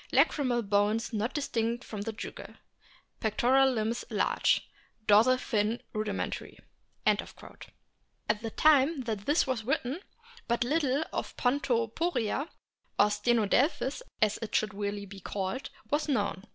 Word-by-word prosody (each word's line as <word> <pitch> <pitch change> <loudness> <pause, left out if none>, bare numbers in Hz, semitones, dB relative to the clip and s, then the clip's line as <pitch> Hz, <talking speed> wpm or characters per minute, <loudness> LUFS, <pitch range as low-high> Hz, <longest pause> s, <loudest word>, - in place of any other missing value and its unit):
Lacrymal 250 -5 +3
bones 210 +4 +1
not 220 +3 0
distinct 235 -4 -1
from 210 -2 -6
the 225 - -3
jugal. 220 - -8 0.6
Pectoral 260 +5 +3
limbs 230 0 -1
large. - - +1 0.4
Dorsal 225 +5 +6
fin 220 -2 0
rudimentary." 215 -2 -3 0.5
At - - +4 1.2
the 225 - -3
time 295 +3 +4
that 220 -5 -4
this 295 +3 +3
was 255 -4 -2
written 260 +4 -1 0.5
but 235 0 +1
little 285 +1 +1
of - - -4
Pon 255 +3 +2
toporia 255 +2 0 0.5
(or 210 +1 +5
Stenodelphis, 240 - +1 0.2
as 215 -1 +1
it 225 -2 -4
should 215 -1 +1
really 200 0 -3
be 200 0 -10
called) 195 +6 -4 0.2
was 300 +1 +1
known. 200 - 0
230 Hz, 125 wpm, -30 LUFS, 210-265 Hz, 1.2 s, Dorsal